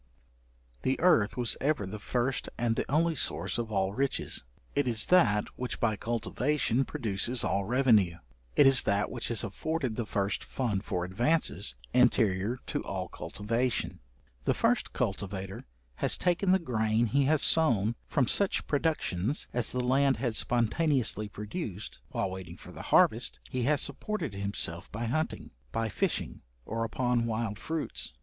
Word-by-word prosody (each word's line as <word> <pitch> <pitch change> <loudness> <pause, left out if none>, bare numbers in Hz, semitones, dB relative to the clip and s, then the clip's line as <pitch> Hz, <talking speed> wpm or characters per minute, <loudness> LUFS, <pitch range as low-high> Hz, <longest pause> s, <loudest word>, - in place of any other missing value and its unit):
The 130 - 0
earth 130 - +3
was 120 -3 +2
ever 140 -6 +1
the 105 +3 -6
first 125 +4 -1
and 115 -1 +1
the - - -3
only 165 +3 +3
source 135 - 0
of 115 -2 -3
all 95 -1 0
riches: 135 - 0 0.3
it 145 -2 +1
is 110 -3 +3
that 105 - +4
which 125 0 -4
by 110 -2 +1
cultivation 120 +4 0
produces 115 +2 0
all 100 0 0
revenue; 110 -7 +3 0.4
it - - +7
is 135 -1 +7
that 100 -1 0
which 120 -2 -4
has 115 -1 +1
afforded 130 +3 -2
the 115 -2 -3
first 100 -1 -1
fund 110 -7 -2
for 90 -4 -2
advances, 120 - +1 0.2
anterior 115 -3 +3
to - - -2
all - - -4
cultivation. 115 +4 -2 0.5
The - - +2
first - - +1
cultivator 95 0 -4 0.3
has - - +1
taken 180 +2 +1
the 190 - +6
grain 110 -7 +1
he 135 +5 +2
has 150 +1 +3
sown 115 -10 +3
from 130 -5 +1
such 200 -1 +3
productions 145 - -1
as 120 -2 0
the 125 -1 -1
land 135 +1 +3
had 120 -2 -2
spontaneously 120 -2 +1
produced; 105 - -6
while 95 - -2
waiting 95 -2 -8
for - - -12
the - - -9
harvest, - - +3
he 130 - -1
has 145 +1 +3
supported 145 - -3
himself 100 -3 -3
by 115 +3 -4
hunting, 155 +7 -2 0.2
by 115 - -1
fishing, - - -2 0.2
or 115 +1 -2
upon 120 0 0
wild 110 -2 -2
fruits. 160 - -3
115 Hz, 155 wpm, -29 LUFS, 105-135 Hz, 0.5 s, it